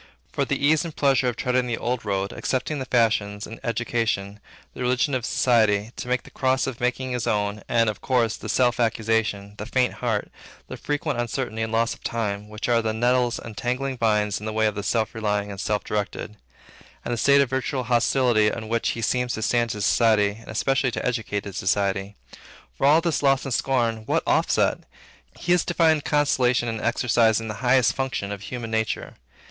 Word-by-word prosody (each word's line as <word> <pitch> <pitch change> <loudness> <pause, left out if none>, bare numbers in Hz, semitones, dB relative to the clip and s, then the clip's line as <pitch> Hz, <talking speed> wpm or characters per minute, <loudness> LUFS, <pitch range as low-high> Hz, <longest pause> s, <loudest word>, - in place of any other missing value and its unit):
For - - 0
the - - -1
ease 150 +3 +3
and 165 -3 -7
pleasure 135 -2 +2
of 120 - -1
treading 125 +1 0
the 120 -1 -2
old 125 0 -2
road, 100 -1 -1
accepting 135 +3 -2
the 130 - -5
fashions, 110 -4 +1
the 115 - -9
education, 115 -4 -1 0.3
the - - -9
religion 125 +3 +1
of 130 -2 -1
society, 110 -5 +3
he 110 - -13
takes 125 +1 -2
the - - -15
cross 130 0 +1
of 130 -3 -5
making 125 +1 -1
his 125 -1 -2
own, 105 0 0
and, 115 -1 +3
of 105 -1 -3
course, 120 -4 +1
the 110 - -8
self 125 +2 +2
accusation, 110 -3 0
the 105 - -5
faint 125 0 +1
heart, 115 -4 -2 0.4
the - - -7
frequent 145 -3 -2
uncertainty 120 -2 -3
and 110 0 -2
loss 115 +1 +1
of - - -16
time, 105 -2 -3
which 105 0 -5
are 120 -1 +3
the 110 -1 -1
nettles 120 +1 +2
and 115 -2 -9
tangling 125 +4 -2
vines 105 -4 +1
in 105 - -7
the - - -2
way 110 0 +1
of 105 - +1
the 100 - -4
self 110 +1 0
relying 105 -2 -1
and 100 - -6
self 105 -1 -1
directed; 105 0 -4 0.7
and 120 - -2
the - - +1
state 140 +4 +5
of 135 -3 0
virtual 130 0 -1
hostility 120 -2 +3
in 110 +1 -3
which 115 0 0
he 115 - -4
seems 125 0 0
to 110 - -3
stand 120 +1 +1
to 105 -2 -4
society, 110 -1 +3
and 110 +2 -14
especially 130 +4 +1
to - - -4
educated 105 -5 -2
society. 100 +1 0 0.6
For 135 - +2
all 155 +3 +6
this 165 -3 0
loss 135 -1 +2
and 135 - -2
scorn, 120 -3 +1
what - - +1
offset? - - +2 0.6
He 175 - +1
is 180 - +3
to 175 - -3
find 160 -3 +3
consolation 130 -5 +2
in 115 -1 -3
exercising 115 -2 +2
the - - -3
highest 125 0 +4
functions 125 -7 -3
of 100 - -8
human 115 +1 -6
nature. 110 0 -2
115 Hz, 205 wpm, -24 LUFS, 105-130 Hz, 0.7 s, all